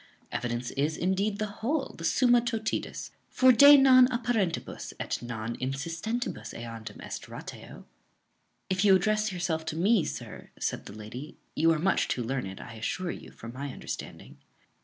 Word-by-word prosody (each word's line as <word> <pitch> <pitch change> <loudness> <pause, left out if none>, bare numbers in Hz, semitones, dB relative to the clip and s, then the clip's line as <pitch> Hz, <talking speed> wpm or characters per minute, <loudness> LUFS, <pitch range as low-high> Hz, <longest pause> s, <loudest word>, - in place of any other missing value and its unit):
Evidence 120 0 -2
is, 150 +3 -1
indeed, 195 +3 0
the 215 - -1 0.2
whole, 275 +5 -1
the 165 - -9
summa 245 +8 +4
totidis, 225 -2 -3 0.2
for 260 0 +6
de 285 +4 +9
non 260 -2 +7
apparentibus 235 -8 -2
et - - -3
non 115 -1 -4
insistentibus 165 - -3
eandem 115 -2 -8
est - - -6
ratio." - - -9 0.8
"If 185 0 0
you 195 -2 +7
address 215 +2 +1
yourself 175 -3 -2
to 155 - -3
me, 195 +3 +3
sir," - - -7
said - - -3
the - - -9
lady, 110 +8 -8 0.2
"you 165 +2 +4
are 160 - +2
much 185 +5 +2
too 125 - -1
learned, 115 -6 -3
I 115 - -9
assure 170 +11 -3
you, - - -9
for 115 - -10
my 135 +3 -5
understanding." - - -8
170 Hz, 160 wpm, -29 LUFS, -, 0.8 s, de